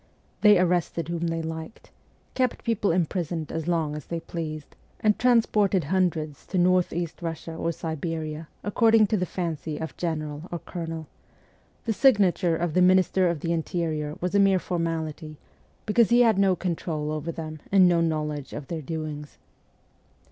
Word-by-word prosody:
They 210 -2 +7
arrested 175 -2 0
whom 170 0 -1
they 165 0 -2
liked, 160 +5 -7 0.4
kept 255 -2 0
people 215 -4 +1
imprisoned 170 -2 -1
as 160 0 -4
long 160 -4 0
as 150 - -8
they 170 - -3
pleased, 155 -2 -6 0.2
and 210 -1 +2
transported 215 -6 +3
hundreds 160 -3 -1
to 190 - -2
North 180 0 +3
east 170 -1 -3
Eussia 165 -1 -5
or 165 - 0
Siberia 160 -1 -4 0.2
according 225 +1 +4
to 210 - 0
the 180 -1 -1
fancy 160 -4 -3
of 160 - -6
general 155 -1 -3
or 175 - -2
colonel; 165 -2 -6 0.8
the 225 - +1
signature 195 -9 +3
of 170 -2 -1
the 180 - +3
Minister 185 0 +4
of 165 -4 -3
the 170 - 0
Interior 160 -3 -2
was 180 +1 -2
a 200 - +4
mere 195 -1 +5
formality, 165 -3 -3 0.5
because 225 +1 +3
he 240 +1 +5
had 225 -4 +4
no 195 -2 +4
control 160 -4 -3
over 155 +2 -3
them 155 -1 -7
and 190 -2 +6
no 170 -1 +3
knowledge 150 -3 -2
of 145 -2 -7
their 165 -2 -3
doings. 155 -1 -6
170 Hz, 160 wpm, -26 LUFS, 155-185 Hz, 0.8 s, They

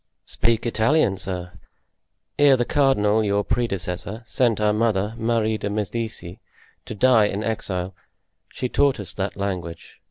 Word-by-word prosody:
"Speak 115 0 0
Italian, 115 0 +2
sir. 90 -1 -4 0.9
Ere 140 -2 +6
the 120 - 0
cardinal, 110 -7 +2
your 100 0 +1
predecessor, 100 -1 -3
sent 115 -2 +1
our 105 0 +2
mother, 105 -1 0
Marie 110 -1 0
de - - -3
Medicis, 105 -3 -4 0.5
to 110 - -6
die 120 -1 +5
in 105 +1 -2
exile, 95 -4 -3 0.6
she 125 - -3
taught 140 0 +2
us 95 -4 -6
that 100 0 -4
language. 90 -4 -5
105 Hz, 135 wpm, -23 LUFS, 95-115 Hz, 0.9 s, Ere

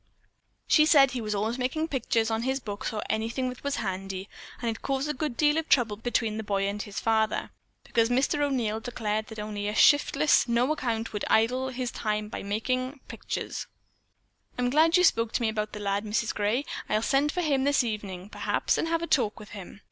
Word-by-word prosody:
She 305 -2 +5
said 275 -5 +6
he 250 - -3
was 210 -1 -2
always 220 +5 -1
making 310 +6 -1
pictures 230 -4 0
on 225 0 0
his 265 +2 0
books 205 -5 -5
or 215 -1 -3
on - - -4
anything 230 +4 -1
that 250 - -9
was 280 0 -1
handy, 190 -1 -4 0.3
and 240 - -3
it - - -13
caused 275 +1 -1
a 300 - -1
good 290 -3 -3
deal 300 +1 +3
of 320 - -6
trouble 230 -6 +3
between 225 -1 -1
the 220 - -3
boy 200 -1 0
and 205 +1 -3
his 205 -1 -5
father, 220 -1 0 0.3
because 230 0 +1
Mr. 265 +4 +1
O'Neil 245 -7 0
declared 220 -2 -3
that 220 - -10
only 210 -1 -4
a 210 - -2
shiftless, 290 +1 +4
no 240 +4 +2
account 230 -7 -2
would 210 - -3
idle 250 +4 +2
his 250 -1 -3
time 210 -1 -2
away - - -4
making 255 +7 -2
pictures. - - -5 0.9
I'm 250 0 0
glad 320 +4 +5
you 360 - +4
spoke 230 -9 +3
to - - 0
me 225 - +2
about 215 -1 -2
the 210 - -7
lad, 200 0 -1
Mrs. 215 +1 -1
Gray. 215 +7 0 0.2
I'll 215 +1 +1
send 280 +4 +2
for 360 - -1
him 280 -5 +1
this 285 -1 +3
evening 205 -4 -5
perhaps, - - 0
and - - 0
have 330 0 0
a - - +1
talk 230 -8 +1
with 210 - -11
him. 195 -1 -10
230 Hz, 215 wpm, -27 LUFS, 210-270 Hz, 0.9 s, said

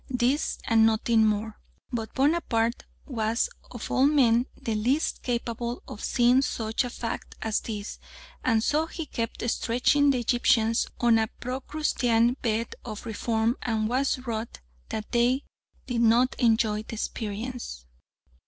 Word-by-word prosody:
This 255 +3 +1
and 225 -1 +4
nothing 220 0 +3
more. 215 +1 -2 0.3
But 225 -3 -4
Bonaparte 260 -6 +1 0.2
was 230 -3 -1 0.2
of 240 -3 -7
all 265 +2 +4
men 250 -5 +4
the 225 - -2
least 250 +9 0
capable 235 -1 -3
of 210 - -8
seeing 245 +1 +4
such 225 -3 -1
a 245 - -4
fact 235 -1 -5
as 220 -1 +1
this, 210 -2 -6 0.4
and 225 -3 +2
so 310 +5 +1
he 325 -1 -6
kept 230 -3 -4
stretching 250 +5 +2
the 270 - +3
Egyptians 230 -1 +2
on 235 -2 +4
a 220 - +1
Procrustean 250 -3 +1
bed 230 0 -1
of 215 -2 -7
reform, 225 +1 0
and 220 -3 0
was 260 +4 +1
wroth 225 -1 -3 0.4
that 215 -1 -5
they 245 +3 +2 0.4
did 245 -3 -1
not 235 +3 +4
enjoy 220 -3 +2
the 225 - -8
experience. 220 - -5
235 Hz, 140 wpm, -27 LUFS, 220-250 Hz, 0.4 s, and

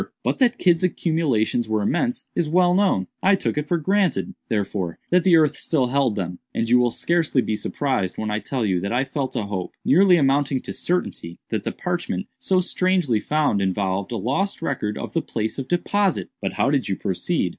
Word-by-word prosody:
"But - - -1
that 245 -2 +3
Kidd's 175 -2 +3
accumulations 150 -11 0
were 110 -1 +1
immense, 245 - -1
is 165 -3 0
well 175 +2 +4
known. 185 - +2 0.2
I 195 +1 +5
took - - -2
it 150 0 -2
for 175 - +1
granted, 170 - 0 0.2
therefore, 100 -5 -2
that 180 0 +4
the 185 -3 +5
earth 155 -2 +4
still 145 -6 0
held 135 -4 +1
them; 90 -3 -4 0.2
and 115 - 0
you 125 +2 +5
will 125 0 +3
scarcely 165 +1 +1
be 110 -3 0
surprised 105 -3 -2
when 110 -1 -2
I 105 - 0
tell 125 0 -2
you 95 -3 +1
that 100 +3 -3
I 125 +3 +1
felt 135 -2 -3
a - - 0
hope, 100 -3 -5
nearly 180 +4 +5
amounting 140 -2 +2
to - - -7
certainty, 85 - -2
that - - -3
the - - -1
parchment - - -3
so 185 -1 +2
strangely 180 - +1
found, 150 -6 +1
involved 95 0 -1
a - - -2
lost 140 - -1
record 110 -9 -2
of - - -6
the - - +1
place 110 +4 -3
of 135 - -5
deposit." 195 +3 0
"But - - -2
how - - +1
did - - 0
you - - 0
proceed?" - - -1
140 Hz, 205 wpm, -23 LUFS, 105-175 Hz, 0.2 s, I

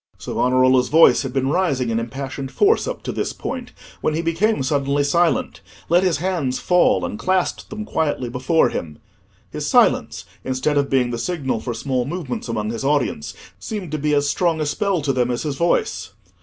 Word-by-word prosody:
'" - - -33
Savonarola's 130 0 +2
voice 165 +2 +6
had 135 - -4
been 135 0 0
rising 140 -10 0
in 115 - 0
impassioned 135 +3 -5
force 415 - +3
up - - -5
to - - -3
this - - -3
point, 250 -1 -6 0.3
when 155 - 0
he 165 - -1
became 165 +1 +1
suddenly 140 +1 +1
silent, 170 +4 +1 0.3
let 175 +2 +5
his 180 -5 +1
hands 165 -7 -1
fall 175 - +3
and 105 +4 -5
clasped 185 0 -1
them 215 0 -6
quietly 150 -9 -1
before 130 +7 +2
him. 75 -3 -5 0.5
His - - -4
silence, - - +2 0.2
instead 130 +3 -1
of 140 -1 +1
being 125 -2 +2
the 120 - -3
signal 140 -7 -2
for 120 +1 -4
small 125 +1 -1
movements 145 -4 -4
amongst 110 -1 -2
his 115 - -5
audience, 135 - -1 0.2
seemed 200 -7 -5
to 155 - -2
be 150 +1 +1
as 145 0 +2
strong 165 +2 +1
a 155 - 0
spell 180 +3 -1
to 140 -2 +1
them 125 -1 +1
as 120 -1 -2
his 150 -3 -2
voice. 100 - 0
140 Hz, 195 wpm, -21 LUFS, 125-170 Hz, 0.5 s, voice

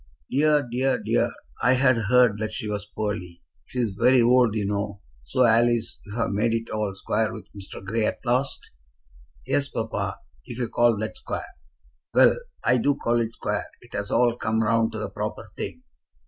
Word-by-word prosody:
"Dear, 145 0 +3
dear, 125 +2 +1
dear! - - +1 0.3
I 125 +2 +5
had 130 0 +4
heard 115 -1 +3
that 110 0 -2
she 110 - -4
was 105 -1 -3
poorly. 90 -6 -4 0.2
She - - -9
is 115 -4 0
very 125 +6 +4
old, 120 -2 +4
you 105 -2 0
know. 100 0 -2 0.3
So, 125 - +2
Alice, 120 0 +3
you've 115 +2 -2
made 110 +3 +1
it 115 0 -4
all 105 -2 -2
square 110 +2 0
with 110 - -8
Mr. 95 -1 -9
Grey 110 +2 0
at - - -2
last?" 125 +3 -1 0.7
"Yes, 140 -1 +1
papa; - - -3 0.3
if 120 - -8
you 120 -2 -2
call 120 -2 +3
that 110 +1 -4
square." - - -4 0.7
"Well; - - +7 0.3
I 125 - +4
do 140 +4 +2
call 120 -2 +1
it 115 0 -3
square. - - -2
It - - -17
has 100 0 -3
all 120 -1 +3
come 110 -1 0
round 115 +1 +2
to - - -4
the 110 - -3
proper - - -4
thing." - - -6
115 Hz, 185 wpm, -25 LUFS, 105-125 Hz, 0.7 s, Well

